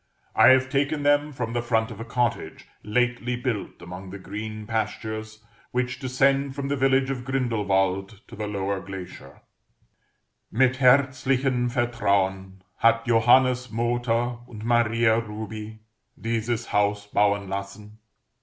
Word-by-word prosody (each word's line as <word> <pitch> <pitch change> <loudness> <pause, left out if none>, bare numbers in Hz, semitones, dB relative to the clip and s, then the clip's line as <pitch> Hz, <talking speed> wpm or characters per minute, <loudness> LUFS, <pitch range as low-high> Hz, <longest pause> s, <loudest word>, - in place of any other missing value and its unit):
I - - +7
have 130 +1 +5
taken 145 +2 0
them 145 +1 +3
from 120 -4 -4
the 120 - 0
front 115 0 0
of 110 - -9
a - - -4
cottage 120 0 -2
lately 125 +2 0
built 120 -7 -4
among 90 +2 -8
the 100 - -7
green 105 +2 -6
pastures 110 0 -4 0.2
which 125 +1 -2
descend 135 +1 +1
from 140 -1 -3
the 145 - +1
village 135 0 +2
of 125 -2 -4
Grindelwald 100 -6 0
to - - -11
the 105 0 -4
lower 100 -1 -2
glacier: 95 -2 -10 1.1
"Mit 130 +3 +3
herzlichem 130 -1 +3
Vertrauen 100 -6 -1
Hat 115 0 +3
Johannes 125 +2 +4
Mooter 120 +1 0
und 110 -2 -9
Maria 115 -1 +3
Rubi 110 0 -7 0.4
Dieses 115 +1 -2
Haus 105 0 +1
bauen 100 -1 +1
lassen. 100 +2 -7
115 Hz, 130 wpm, -25 LUFS, 105-125 Hz, 1.1 s, I